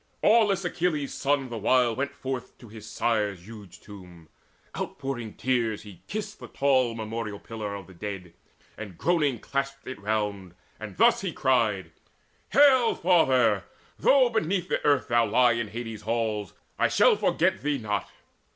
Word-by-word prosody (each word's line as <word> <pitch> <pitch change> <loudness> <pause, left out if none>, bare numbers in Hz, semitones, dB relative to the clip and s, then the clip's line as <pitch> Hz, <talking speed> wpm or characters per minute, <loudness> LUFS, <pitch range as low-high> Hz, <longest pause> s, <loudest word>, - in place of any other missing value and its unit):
Aweless 205 -4 +4
Achilles' 165 -5 -1
son 140 -2 0
the 115 -2 -5
while 120 +1 +3
went 140 +2 -3
forth 130 -2 -6
To 120 - -14
his 110 0 -11
sire's 105 -6 -1
huge 105 -5 -12
tomb. 90 -5 -13 0.5
Outpouring 130 -6 -5
tears, 120 -4 -1
he 100 -5 -13
kissed 210 0 -5
The - - -9
tall 130 -4 +1
memorial 110 -1 -5
pillar 105 -3 -6
of 100 - -8
the 95 - -15
dead, 90 -2 -7 0.5
And 100 -5 -8
groaning 150 -7 +1
clasped 140 +3 -4
it 130 -5 -7
round, 100 -4 -2 0.2
and - - -8
thus - - +4
he - - -3
cried: 105 -9 +1 0.6
"Hail, 260 -4 +5
father! 130 - +3 0.3
Though 265 -3 +5
beneath 185 -4 -1
the - - -1
earth 145 -2 +2
thou 120 -1 +3
lie 120 +3 +4
In 115 -1 -2
Hades' 115 0 -7
halls, 110 -4 -2 0.3
I - - +4
shall - - +4
forget - - +1
thee 145 +1 0
not. 105 -4 -3
115 Hz, 155 wpm, -26 LUFS, 105-140 Hz, 0.6 s, Hail